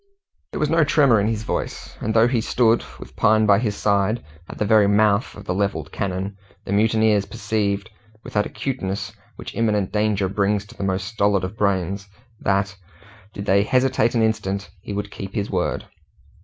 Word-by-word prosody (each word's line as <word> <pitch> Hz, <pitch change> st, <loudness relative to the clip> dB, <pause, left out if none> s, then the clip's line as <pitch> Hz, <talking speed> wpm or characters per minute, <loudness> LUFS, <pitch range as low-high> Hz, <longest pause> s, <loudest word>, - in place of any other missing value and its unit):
There -, -, -5 dB
was 150 Hz, -, 0 dB
no 165 Hz, -1 st, +4 dB
tremor 140 Hz, -6 st, +4 dB
in 100 Hz, -, +1 dB
his 110 Hz, -1 st, -1 dB
voice, -, -, -4 dB
and 110 Hz, -, -2 dB
though 115 Hz, +1 st, +6 dB
he 120 Hz, -2 st, +1 dB
stood, 115 Hz, 0 st, +2 dB, 0.2 s
with -, -, -11 dB
Pine 110 Hz, 0 st, +4 dB
by 100 Hz, -1 st, +5 dB
his 105 Hz, -3 st, -1 dB
side, 105 Hz, +3 st, +1 dB, 0.3 s
at -, -, -8 dB
the 105 Hz, -, 0 dB
very 105 Hz, -1 st, +5 dB
mouth 105 Hz, +1 st, +2 dB
of -, -, -11 dB
the -, -, -1 dB
levelled 90 Hz, -6 st, -2 dB
cannon, 95 Hz, 0 st, -3 dB, 0.3 s
the 100 Hz, -, -2 dB
mutineers 110 Hz, -1 st, +3 dB
perceived, 100 Hz, -2 st, -1 dB, 0.4 s
with -, -, -10 dB
that 105 Hz, 0 st, +1 dB
acuteness 110 Hz, -4 st, -4 dB, 0.2 s
which -, -, -8 dB
imminent 105 Hz, -4 st, 0 dB
danger 105 Hz, -2 st, +1 dB
brings 100 Hz, +1 st, 0 dB
to -, -, -15 dB
the 100 Hz, -, -5 dB
most 95 Hz, -1 st, -1 dB
stolid 100 Hz, -3 st, +1 dB
of 95 Hz, +3 st, -4 dB
brains, 100 Hz, -1 st, -1 dB, 0.3 s
that, 100 Hz, 0 st, 0 dB, 0.6 s
did 100 Hz, -1 st, -7 dB
they 100 Hz, +1 st, +4 dB
hesitate 125 Hz, +1 st, +2 dB
an 115 Hz, -, +3 dB
instant, 100 Hz, -4 st, -1 dB
he -, -, -7 dB
would 100 Hz, 0 st, -4 dB
keep 100 Hz, 0 st, -7 dB
his 100 Hz, -2 st, -2 dB
word. 90 Hz, -2 st, -1 dB
105 Hz, 185 wpm, -22 LUFS, 100-110 Hz, 0.6 s, though